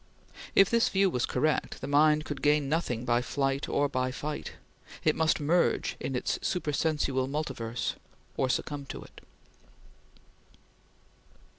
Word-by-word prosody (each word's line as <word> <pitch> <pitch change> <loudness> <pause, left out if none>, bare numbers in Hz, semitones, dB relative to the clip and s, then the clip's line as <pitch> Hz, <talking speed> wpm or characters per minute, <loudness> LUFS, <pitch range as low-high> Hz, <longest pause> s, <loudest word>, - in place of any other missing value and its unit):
If 195 - +7
this 235 0 +3
view 195 -1 +2
was 125 -5 0
correct, 150 +4 0
the - - -5
mind 150 +2 +4
could 145 -3 -5
gain 150 0 +3
nothing 130 -6 -1
by 120 0 +2
flight 135 +2 -1
or 145 - +2
by 130 -2 -1
fight; 150 +3 -5 0.5
it 155 - +3
must 160 0 +2
merge 165 +4 +1
in 135 - -3
its 125 - -1
supersensual 150 -5 0
multiverse, 135 -5 -3 0.4
or 130 - 0
succumb 140 +1 -2
to - - -7
it. - - -15
145 Hz, 135 wpm, -29 LUFS, 130-155 Hz, 0.5 s, If